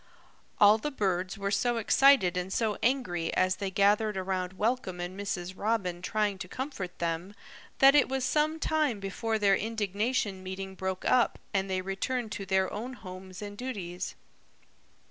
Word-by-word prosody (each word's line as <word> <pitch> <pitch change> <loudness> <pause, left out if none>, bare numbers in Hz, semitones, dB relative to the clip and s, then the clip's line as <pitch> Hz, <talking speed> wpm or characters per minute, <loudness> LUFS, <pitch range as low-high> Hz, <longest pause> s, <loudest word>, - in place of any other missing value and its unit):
All 210 +1 +7
the 295 - -2
birds 190 -8 -1
were 200 0 -2
so 240 +3 +1
excited 225 -5 +5
and 180 +1 -2
so 215 0 0
angry, 230 -10 0
as 185 0 +2
they 200 -1 -2
gathered 205 +2 +2
around 185 -1 -2
Welcome 210 -3 -1
and 175 +1 -4
Mrs. 190 -2 -4
Robin 195 -5 -1
trying 205 0 -1
to 185 - -6
comfort 200 -6 -5
them, 170 +4 -3 0.4
that 270 +1 +7
it 290 -3 +4
was 265 -1 -1
some 310 +1 +1
time 305 -9 +1
before 220 +3 -2
their 200 -2 +4
indignation 210 -1 -1
meeting 190 +1 -6
broke 190 0 -4
up 250 -2 +3 0.2
and 195 -1 0
they 185 -1 0
returned 215 +5 -2
to 195 - -5
their 190 0 +1
own 235 +5 -5
homes 185 -3 -9
and 205 0 -7
duties. 190 -7 -5
200 Hz, 165 wpm, -29 LUFS, 185-230 Hz, 0.4 s, All